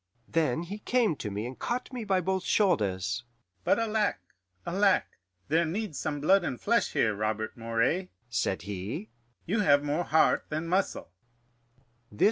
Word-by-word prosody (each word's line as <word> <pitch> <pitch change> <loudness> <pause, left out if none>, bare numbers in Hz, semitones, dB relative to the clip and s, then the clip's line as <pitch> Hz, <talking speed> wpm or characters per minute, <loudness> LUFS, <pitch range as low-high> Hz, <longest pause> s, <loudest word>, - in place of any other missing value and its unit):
"Then 160 -2 +1
he 200 +5 -6
came 225 -6 +2
to 105 - -4
me 105 +2 -3
and 125 +1 -7
caught 250 +2 -3
me 245 -2 -4
by 190 -2 +2
both 190 +1 -1
shoulders. 115 - +1 0.4
'But - - +3
alack, 220 -2 +1 0.5
alack! 195 +1 +3 0.4
there 160 +4 +3
needs 180 0 -3
some 145 - -2
blood 190 +5 +5
and 125 -7 -3
flesh 235 +2 +1
here, 110 - +2
Robert 110 +1 -2
Moray,' 115 +11 0 0.2
said 115 -5 -1
he. 100 +2 -5 0.4
'You 210 +6 0
have 145 -7 +4
more 150 +4 0
heart 160 - +3
than 155 +2 -3
muscle. 185 - -1
160 Hz, 150 wpm, -29 LUFS, -, 0.5 s, blood